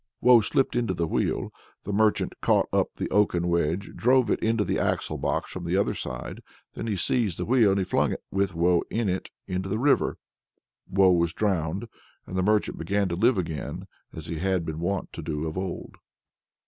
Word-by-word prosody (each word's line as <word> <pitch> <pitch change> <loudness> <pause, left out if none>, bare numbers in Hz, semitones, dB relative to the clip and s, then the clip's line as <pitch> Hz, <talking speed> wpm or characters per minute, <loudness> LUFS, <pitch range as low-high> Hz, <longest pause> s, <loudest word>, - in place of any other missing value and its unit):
Woe 125 -2 +7
slipped 130 +5 +1
into 120 -6 0
the 85 - 0
wheel; - - -1 0.3
the 100 - -4
merchant 110 +1 +2
caught - - +3
up - - +1
the - - -3
oaken 90 -4 +2
wedge, 85 +3 0
and - - -14
drove 125 -1 +3
it - - +1
into 110 -1 +1
the - - 0
axle - - -1
box - - -1
from 95 - -6
the 85 +2 0
other 100 - +1
side. - - -6 0.3
Then - - -5
he 105 - 0
seized 100 0 0
the 90 - -3
wheel 115 -4 +4
and 95 -1 0
flung - - +1
it, - - -7
with 95 -2 0
Woe 85 +1 +3
in 115 -1 -1
it, 95 0 -2 0.2
into 95 +1 -3
the 105 - -1
river. 135 +4 +2 0.7
Woe 95 -1 +5
was 85 -2 +2
drowned, 95 0 -1 0.4
and 90 - -7
the 95 - +1
merchant 105 +2 +1
began 100 -1 0
to 85 - -2
live 115 +5 +3
again 80 -5 -4 0.3
as 80 - -8
he 85 -2 -4
had 95 -1 0
been 80 -1 -4
wont 95 +3 -2
to - - -6
do 75 0 -3
of 80 - -4
old. 95 -1 -5
95 Hz, 205 wpm, -26 LUFS, 85-105 Hz, 0.7 s, Woe